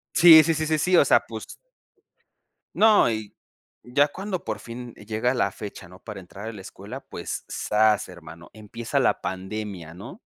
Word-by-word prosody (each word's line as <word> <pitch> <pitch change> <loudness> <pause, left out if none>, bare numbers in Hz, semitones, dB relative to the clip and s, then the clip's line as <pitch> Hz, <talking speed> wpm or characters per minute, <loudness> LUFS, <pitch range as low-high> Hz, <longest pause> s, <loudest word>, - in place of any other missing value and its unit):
Sí, 165 -2 +9
sí, 165 +1 +1
sí, 155 0 -2
sí, 155 0 +1
sí. 180 +4 +2
O - - +6
sea, - - +4
pues - - -7 1.3
No, 215 - +5
y 110 -2 -5 0.5
ya 140 +4 +2
cuando 190 +3 -5
por 110 - -4
fin 120 0 -9
llega 110 +4 -2
la 100 -5 +1
fecha, 100 -4 -9
¿no?, 90 +1 -15
para 105 -3 -9
entrar 100 +4 -9
a - - -6
la 105 - -10
escuela, 105 +8 -9
pues - - -7
¡zas!, 105 0 +1
hermano, 85 -2 -13
empieza 110 +1 -4
la - - +1
pandemia, 95 -3 -6
¿no? 120 - -11
110 Hz, 175 wpm, -24 LUFS, 100-145 Hz, 1.3 s, Sí